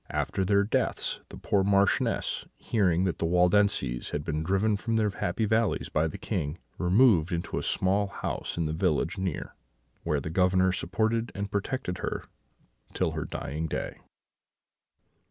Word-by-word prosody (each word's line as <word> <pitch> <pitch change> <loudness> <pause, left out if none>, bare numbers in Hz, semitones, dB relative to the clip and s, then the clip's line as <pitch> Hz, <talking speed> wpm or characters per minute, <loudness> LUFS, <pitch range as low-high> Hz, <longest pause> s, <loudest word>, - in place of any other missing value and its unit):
After 95 - -1
their 100 +1 +3
deaths, 100 - 0
the - - -9
poor 100 -2 +1
Marchioness, 100 0 +1
hearing 90 -6 +1
that 95 -3 -1
the 85 - +1
Waldenses 90 -7 +2
had 75 - -3
been 75 0 -2
driven 95 +6 +2
from 115 +3 -2
their 110 -2 +2
happy 95 +3 -1
valleys 110 -1 +1
by 80 +1 +1
the 80 - -6
King, 75 +3 -3 0.2
removed 95 -2 +4
into 85 0 -2
a - - -3
small 100 +2 +1
house 100 - -4
in 85 - 0
the 75 - -2
village 85 +1 0
near, 95 -5 -3 0.5
where 75 -3 0
the 80 +3 -5
Governor 95 +1 +3
supported 110 +5 0
and 100 0 -4
protected 100 -1 -2
her - - -3 0.7
till - - +1
her - - -3
dying 80 +3 -4
day." - - -4
95 Hz, 155 wpm, -28 LUFS, 85-100 Hz, 0.7 s, removed